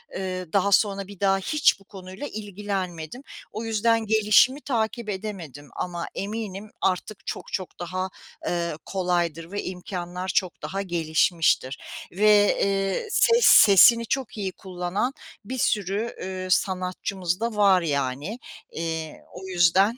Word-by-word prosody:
Eee, 185 -3 -4
daha 200 0 +2
sonra 195 -1 +2
bir 200 -2 -12
daha 195 -1 +3
hiç 295 +3 +2
bu - - -19
konuyla 190 +6 -8
ilgilenmedim. 200 - -5 0.3
O 220 +2 -5
yüzden 225 +1 +1
gelişimi 220 +6 +4
takip 230 -3 -2
edemedim 180 -9 -6
ama 175 -1 -4
eminim 210 0 -5
artık 190 +2 -1
çok - - -6
çok 185 -2 -4
daha, 185 +2 -3 0.4
eee, 170 -2 -1
kolaydır 175 -3 -1
ve 205 - -3
imkânlar 180 0 -5
çok 185 -2 0
daha 195 +1 -3
gelişmiştir 165 -5 +1 0.3
ve, 205 +1 +4
eee, 195 - 0
ses 465 +1 +4
sesini 220 +3 +8
çok 255 -2 -3
iyi 195 -2 -2
kullanan 185 +8 -3 0.3
bir 260 +3 -5
sürü, 210 +1 0
üüü, 185 0 -5
sanatçımız 185 -1 -1
da 230 0 -2
var 195 -3 +5
yani. 145 - -2 0.3
Eee, 160 -1 -4
o 190 - -9
yüzden 190 +5 +3
190 Hz, 130 wpm, -25 LUFS, 180-210 Hz, 0.4 s, sesini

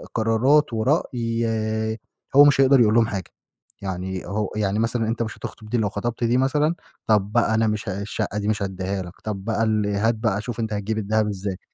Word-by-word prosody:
قرارات 115 +5 +3
ورأي 115 -4 -1 0.4
هو 145 - +10
مش 140 -1 +5
هيقدَر 135 0 +6
يقول 105 -2 +4
لهم 115 -1 +4
حاجة، 95 -4 -5 0.5
يعني 95 -1 -4
هو 105 +2 -2
يعني 105 -1 0
مثلًا 115 0 0
أنت 115 +1 -1
مش 110 - -6
هتخطُب 110 - -9
دي، 120 - 0
لو 105 -3 +1
خطَبت 120 +4 -3
دي 120 +2 +3
مثلًا 150 +5 +2 0.3
طَب 105 -2 +2
بقى 115 -1 +3
أنا 110 0 +2
مش 105 0 -2
الشقة 100 +2 -3
دي 105 - -3
مش 110 -1 0
هادّيها 95 0 -3
لك، 90 - -10
طَب 100 -2 -4
بقى 115 -1 0
ال 110 -2 +1
هات 105 +3 +1
بقى 110 -2 -1
شوف 120 +1 -6
أنت 110 -1 -2
هتجيب 105 +2 -2
الدهب 110 0 +1
إزاي؟ 100 -2 -4
110 Hz, 200 wpm, -23 LUFS, 100-115 Hz, 0.5 s, هو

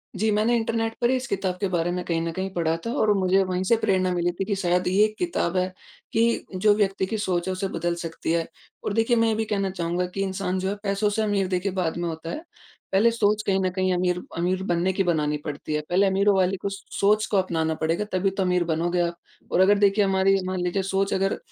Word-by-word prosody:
जी, 215 +3 +1
मैंने 220 +3 +2
इंटरनेट 225 0 -1
पे 245 +2 +3
इस 255 - -2
किताब 190 -2 -2
के 195 - +1
बारे 175 -1 0
में 180 0 -2
कहीं 165 -1 0
न 165 0 -2
कहीं 190 +3 -3
पढ़ा 165 -2 0
था 230 - -2
और 215 - +3
मुझे 190 +1 +3
वहीं 185 0 -2
से 210 +5 +3
प्रेरणा 185 -4 +1
मिली 175 0 0
थी 195 - 0
कि 205 - -1
शायद 180 -1 0
ये 205 +4 +4
किताब 190 - -1
है 185 0 +2 0.5
कि 230 +1 +2
जो 205 +3 +4
व्यक्ति 195 -2 +1
की 220 +3 -3
सोच 185 -3 -1
उसे 185 +1 -2
बदल 170 -1 -2
सकती 165 0 -4
है 165 -1 0 0.4
और 205 - -2
देखिए 225 +2 +2
मैं 230 0 +3
ये 220 - +1
भी 220 0 -1
कहना 200 -2 -1
चाहूँगा 180 -1 -2
कि 195 - -1
इंसान 190 -1 -2
जो 190 - -1
है 200 - -2
पैसों 200 +1 +1
से 220 +2 -1
अमीर 205 -3 +1
देखिए 185 +1 -1
बाद 180 -3 -2
में 175 0 -2
होता 160 +1 -6
है 310 - -5 0.5
पहले 205 +5 +4
सोच 215 -2 +1
कहीं 195 -1 +2
न 185 - +1
कहीं 185 -1 +1
अमीर 180 0 0 0.2
अमीर 185 +2 0
बनने 175 0 +1
की 195 - +1
बनानी 150 -4 0
पड़ती 150 +1 -5
है। 150 - +1
पहले 190 +3 +3
अमीरों 195 +1 +3
वाली 190 0 +2
कुछ 200 +2 -5 0.2
सोच 210 +2 +3
को 200 - +3
अपनाना 160 -4 0
पड़ेगा 165 +6 0
तभी 185 +1 +1
तो 195 0 -1
अमीर 180 -1 +2
बनोगे 170 +2 0
आप 170 0 -1 0.3
और - - +2
अगर 200 +2 +5
देखिए 205 +1 +4
हमारी 195 0 +3
मान 185 0 -2
लीजिए 185 +2 0
सोच 195 +1 0
अगर 195 +1 0
190 Hz, 245 wpm, -25 LUFS, 175-205 Hz, 0.5 s, अगर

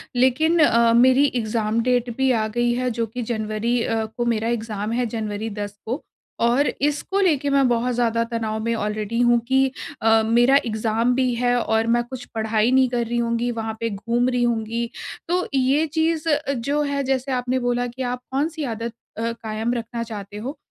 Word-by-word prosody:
लेकिन 310 +7 +3
अ, 235 -5 +5
मेरी 260 +4 +5
exam 220 -1 0
date 245 -1 +1
भी 265 -1 +3
आ 220 -2 +1
गई 240 +2 0
है, 250 +1 -1
जो 230 0 -1
कि 245 +3 -6
जनवरी 220 +2 -1
अ, 225 -1 -1
को 240 +2 -4
मेरा 225 -1 0
एग्ज़ाम 220 -2 -3
है 245 +1 0
जनवरी 220 -1 -3
दस 205 0 -6
को। 250 +7 -3 0.4
और 240 +5 +3
इसको 295 +7 0
लेके 295 -6 +2
मैं 275 -1 +4
बहुत 245 +1 +1
ज़्यादा 230 -1 +1
तनाव 220 -1 -2
में 230 +1 0
आलरेडी 215 +1 -2
हूँ 240 0 +4
कि 265 +1 +4 0.4
अ, 225 0 +5
मेरा 240 +4 +4
एग्ज़ाम 225 +2 0
भी 255 -2 +1
है 245 +1 +1
और 220 +1 +1
मैं 240 +1 +2
कुछ 245 +1 -8
पढ़ाई 220 +1 +1
नहीं 260 0 +5
कर 240 -1 -1
रही 240 +1 -2
होंगी, 235 +1 0
वहाँ 225 -1 -3
पे 230 - -1
घूम 235 +4 0
रही 245 -1 0
होंगी। 230 0 -1 0.4
तो 360 +1 0
ये 270 +4 +3
चीज़ 320 +1 0
अ, 295 -1 +2
जो 280 +4 -1
है 280 -1 -1
जैसे 265 0 -1
आपने 255 0 0
बोला 245 0 0
कि 245 +2 -8
आप 250 0 -2
कौन-सी 305 +3 -1
आदत 230 -2 -4 0.2
अ, 230 +1 -1
कायम 220 +2 -2
रखना 235 0 -4
चाहते 210 -3 -8
हो, 265 +8 -5
240 Hz, 195 wpm, -22 LUFS, 225-255 Hz, 0.4 s, अ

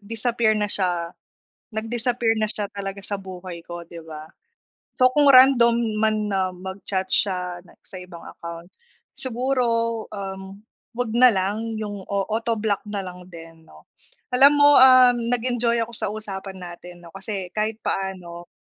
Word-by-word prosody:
disappear 225 +1 0
na 210 - 0
siya 175 -3 -2 0.6
nag-disappear 225 +1 -1
na 215 - +1
siya 210 -1 -5
talaga 200 0 -6
sa 200 0 -4
buhay 185 -3 -9
ko 175 0 -7
'di 170 - -11
ba? 155 0 -10 0.7
So, 255 -1 +5
kung 290 +2 +4
random 255 -3 +6 0.2
man 220 0 +2
na 190 -1 +1
mag-chat 190 +1 -4
siya, 180 -3 +1
like - - -21
sa 190 - -10
ibang 180 -2 -11
account, 170 0 -9 0.5
siguro, 255 0 0 0.5
um, 195 -1 -7 0.4
huwag 245 -2 -2
na 255 +1 +7
lang, 210 +4 -2
yung 205 -2 -6
o-autoblock 215 +1 -1
na 205 -1 -3
lang 180 -1 -10
din, 165 -2 -14
'no? - - -17 0.5
Alam 275 +3 +6
mo, 290 0 +6
ah, 255 -1 +8
nag-enjoy 235 0 0
ako 230 - -9
sa 230 - -3
usapan 195 -3 -7
natin 175 0 -11
'no, 170 - -13
kasi, 195 -1 -6
kahit 215 +1 -2
paano 175 -3 -4
200 Hz, 150 wpm, -23 LUFS, 180-230 Hz, 0.7 s, ah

